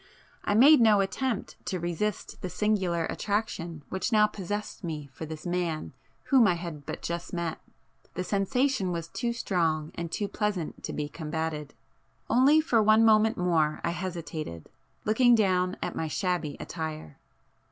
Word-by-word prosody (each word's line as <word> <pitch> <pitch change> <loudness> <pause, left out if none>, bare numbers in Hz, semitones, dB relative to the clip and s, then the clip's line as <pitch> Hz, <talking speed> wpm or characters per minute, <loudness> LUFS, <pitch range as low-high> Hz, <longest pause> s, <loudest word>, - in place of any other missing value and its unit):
I 205 - +1
made 275 +4 +8
no 215 -3 +6
attempt 210 +4 -2
to 185 - -1
resist 175 +5 -3
the 185 - -3
singular 180 -3 0
attraction 175 -8 -3
which 190 +6 -2
now 215 -1 +6
possessed 205 0 -5
me 155 -4 -4
for 160 - -7
this 155 +1 -8
man 175 -3 -2 0.3
whom 260 -5 +5
I 180 - +3
had 170 -4 -7
but - - -5
just 170 +2 -4
met,—the 170 +1 -6
sensation 200 +2 +1
was 170 -1 -4
too 235 +6 -2
strong 165 -9 0
and 170 -1 -5
too 205 - -1
pleasant 200 -6 -3
to - - -4
be 150 -1 -2
combated. 155 -1 -4 0.6
Only 275 +5 +6
for 235 -8 +3
one 215 +1 +5
moment 220 0 +4
more 160 -4 +1
I 170 - 0
hesitated, 165 - -5 0.3
looking 240 +3 +5
down 185 -4 +2
at - - -3
my 160 - -2
shabby 175 -3 -1
attire. 155 - -6
180 Hz, 150 wpm, -28 LUFS, 160-210 Hz, 0.6 s, made